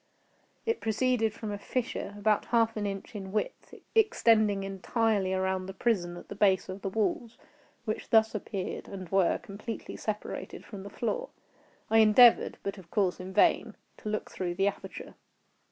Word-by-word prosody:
It 455 -1 0
proceeded 225 0 +1
from 215 0 -6
a 205 - -4
fissure, 230 -2 -3
about 210 0 +2
half 230 -1 +2
an 210 -1 -1
inch 195 +2 -6
in 195 -3 -6
width, 215 - -3 0.2
extending 225 - +4
entirely 195 +1 0
around 190 0 0
the 190 - -7
prison 180 -6 0
at - - -11
the - - -6
base 195 -2 +2
of 190 +1 -6
the 195 - -2
walls, 225 +3 -1 0.5
which 215 -1 -3
thus 220 -1 +5
appeared, 200 -3 -4
and 190 -2 -7
were, 190 -1 +3
completely 220 +1 -7
separated 215 -1 -5
from 205 -4 -8
the 200 - -8
floor. - - -2 0.6
I 225 - +6
endeavored, 225 +2 +6
but 200 0 -4
of 175 -3 -15
course 190 -2 +1
in 185 +1 -7
vain, - - +3 0.2
to 215 - -6
look 215 0 -3
through 175 -2 -3
the 195 +2 +2
aperture. 200 - -5
205 Hz, 170 wpm, -29 LUFS, 190-225 Hz, 0.6 s, I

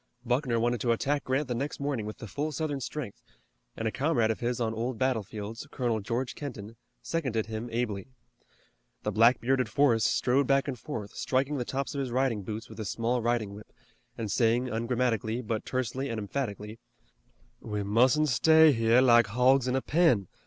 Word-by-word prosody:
Buckner 125 -1 +1
wanted 120 -1 0
to 120 - +2
attack 140 +5 -1
Grant 135 +2 0
the 125 - -2
next 140 +5 -3
morning 140 -7 -2
with 105 - -7
the - - -8
full 145 +8 -3
Southern 145 -2 -3
strength, 130 -4 -6 0.6
and 115 - -2
a - - 0
comrade 130 -5 +1
of 110 - -4
his 120 0 -1
on 115 -2 -1
old 115 +2 -3
battlefields, 110 -3 -3
Colonel 120 -4 -1
George 120 +5 -3
Kenton, 115 -6 -7 0.3
seconded 130 -10 -1
him 110 +2 -5
ably. 115 -4 -2 1.0
The 105 - -1
black 115 +4 +5
bearded 130 -1 +1
Forrest 115 -3 +3
strode 130 +2 +2
back 135 0 +2
and 130 -4 -4
forth, 110 -9 -6
striking 135 +3 0
the 125 - -2
tops 135 +4 -3
of 140 - -3
his 135 -2 -2
riding 125 -3 0
boots 110 +4 -6
with - - -12
a 110 - -3
small 115 +4 -1
riding 115 -3 -1
whip, 105 +1 -12 0.5
and 110 -3 -3
saying 120 +2 +2
ungrammatically, 115 -1 -1
but 110 -1 -3
tersely 130 +2 -2
and 115 - -3
emphatically: 105 -1 -4 0.8
"We 105 -2 -4
mustn't 125 +9 +3
stay 160 +4 +6
here 115 0 +4
like 120 -3 +6
hogs 125 +4 +3
in 125 - +1
a 130 - 0
pen. 150 - +3
120 Hz, 185 wpm, -28 LUFS, 110-135 Hz, 1.0 s, stay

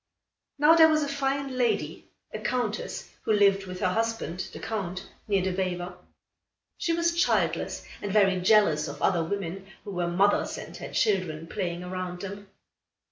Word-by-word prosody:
Now 295 +3 +6
there 325 -1 +8
was 310 -1 +2
a - - -2
fine 275 -1 -2
lady, 240 -2 0 0.3
a - - -4
Countess, 240 -4 -3
who 220 - +1
lived 200 -2 +3
with 185 0 -7
her 185 - +2
husband, 225 -3 -2
the - - -9
Count, 190 -4 -4 0.2
near 200 -3 +2
the 190 -1 0
Vijver. 180 -1 -2 0.9
She 335 - 0
was 335 +1 +1
childless - - 0 0.2
and 205 - -3
very 195 -3 +3
jealous 180 -6 +4
of - - -7
other 175 -3 +2
women 195 +1 -4 0.2
who 205 - -7
were 175 -2 -1
mothers 195 +4 +2
and - - -8
had - - -8
children 185 -8 +1
playing 175 -1 -3
around 180 -1 -5
them. 200 0 -7
195 Hz, 165 wpm, -27 LUFS, 180-230 Hz, 0.9 s, there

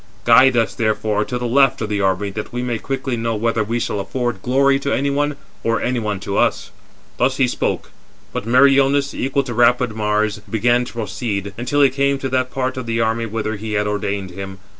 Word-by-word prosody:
Guide 125 +2 +6
us, 115 -1 +1
therefore, 110 -1 0
to 125 - -3
the 125 - -4
left 135 +2 +3
of 110 - -2
the 105 -1 -1
army 95 +1 0
that 105 +2 -6
we 120 0 -3
may 120 -2 -2
quickly 135 -1 -3
know 115 -1 -2
whether 115 +1 0
we 115 +3 -2
shall 105 - -2
afford 120 +1 -3
glory 135 +3 +3
to 140 0 -2
any 140 +1 +1
one, 145 +1 0 0.3
or 115 0 +1
any 125 0 -1
one 105 -3 -2
to 100 -1 -2
us." - - 0 0.5
Thus 130 +1 +1
he 130 - +3
spoke. - - -2 0.4
But 105 - -4
Meriones, 140 +2 +4
equal 135 +1 0
to 125 -2 -5
rapid 120 -1 +3
Mars, 105 0 0
began 120 +2 +2
to - - -10
proceed, 105 -3 -3
until 130 +6 +1
he 135 - +5
came 140 +1 +1
to 135 0 -4
[that 130 0 0
part 130 0 -2
of] 130 -2 -5
the 115 0 -1
army 115 0 0
whither 110 0 -3
he 110 +1 -5
had 105 0 +1
ordered 100 -2 -2
him. 95 +1 -7
120 Hz, 215 wpm, -19 LUFS, 105-130 Hz, 0.5 s, Guide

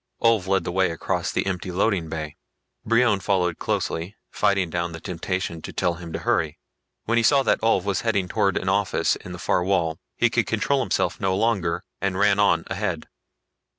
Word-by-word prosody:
Ulv 115 -5 +3
led 95 -2 +2
the 85 - -3
way 95 +1 +2
across 85 - -2
the - - -1
empty 95 -1 -3
loading 90 -3 0
bay. 80 -2 -5 0.5
Brion 115 -2 +3
followed 90 -4 0
closely, 85 +6 -2 0.2
fighting 95 -4 +1
down 85 0 -2
the 80 - -7
temptation 90 -1 -3
to - - -7
tell 90 -2 0
him 85 -1 -9
to - - -3
hurry. 80 -1 0 0.5
When 115 +1 0
he - - +1
saw 140 +3 +4
that - - +2
Ulv 110 -5 +2
was 100 0 -1
heading 100 -5 0
towards 100 -1 +1
an - - -3
office - - +1
in 90 - -10
the 90 - -6
far 90 - +1
wall, 85 -4 0 0.2
he - - +2
could - - +1
control 140 -1 +1
himself 90 -8 0
no 95 -1 +1
longer 100 -5 0 0.2
and 95 -1 -1
ran 100 0 +3
on 85 -5 +3
ahead. 95 -5 -3
95 Hz, 195 wpm, -24 LUFS, 85-105 Hz, 0.5 s, saw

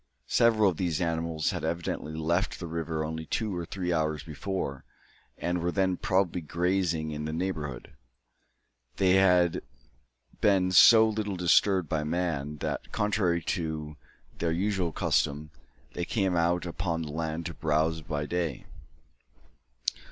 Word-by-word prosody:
Several 110 - +4
of 85 - -9
these 85 -5 -1
animals 80 -2 -1
had - - -4
evidently 80 -1 -3
left 85 +4 0
the 90 - -5
river 80 -1 -3
only 80 0 -5
two 110 -4 -2
or 85 -1 -4
three 90 -2 -2
hours 80 -2 0
before, 75 -2 -4 0.5
and 85 0 -1
were 85 +1 0
then 95 0 +1
probably 90 -1 0
grazing 85 -1 0
in 75 0 -4
the 80 - -3
neighbourhood. 80 -6 -4 1.0
They 95 -2 +3
had 90 -3 +4 0.8
been 95 -3 +3
so 110 +6 +8
little 105 -2 -2
disturbed 90 +1 +3
by 75 -1 -1
man, 75 -3 -2
that, - - -3
contrary 95 -5 +1
to 80 -4 -4 0.4
their 85 - 0
usual 95 0 0
custom, 75 0 0 0.4
they 90 - -3
came 95 -5 0
out 85 +1 +1
upon 85 -1 -2
the 75 - -6
land 80 +1 -3
to 85 - -4
browse 80 +1 0
by 75 -1 -3
day. 85 -1 -2
85 Hz, 140 wpm, -28 LUFS, 80-90 Hz, 1.0 s, so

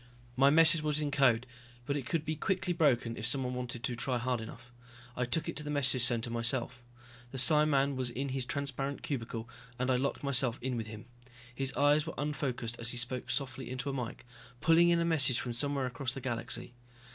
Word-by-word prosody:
My 135 +2 +5
message 160 +1 +5
was 150 -1 0
in 150 -1 -2
code, 125 -4 +3 0.4
but 140 - -1
it 135 -4 -4
could 160 -2 -1
be 155 - -2
quickly 180 +2 -1
broken 130 -8 +2
if 110 - -2
someone 125 0 0
wanted 125 -1 -5
to 125 - -2
try 125 +1 -1
hard 120 -1 -1
enough. 115 +2 -11 0.4
I 125 - -1
took 140 +7 -1
it - - -4
to 150 - -2
the 150 - -6
message 140 -3 +1
center 120 -1 +1
myself. 120 +1 0 0.5
The 135 - -7
psiman 140 +1 +6
was 130 -1 -1
in 135 +3 -4
his 130 0 -2
transparent 140 0 -3
cubicle 115 -4 -4 0.3
and 130 +1 0
I 125 - +3
locked 140 +3 -2
myself 130 -3 +2
in 125 0 -3
with 115 -2 -4
him. 110 -1 -9 0.5
His 135 +2 -2
eyes 145 +1 +3
were - - -5
unfocused 135 -5 -3
as 115 0 -1
he 125 - -4
spoke 125 +1 -4
softly 130 -2 -3
into 130 +2 -3
a - - -6
mike, 125 -3 -5 0.3
pulling 165 +3 +5
in 170 0 +3
a 170 - +1
message 135 -7 +2
from 120 - -4
somewhere 140 +2 0
across 125 0 -2
the 135 - -7
galaxy. 120 -1 -2
130 Hz, 210 wpm, -31 LUFS, 120-145 Hz, 0.5 s, psiman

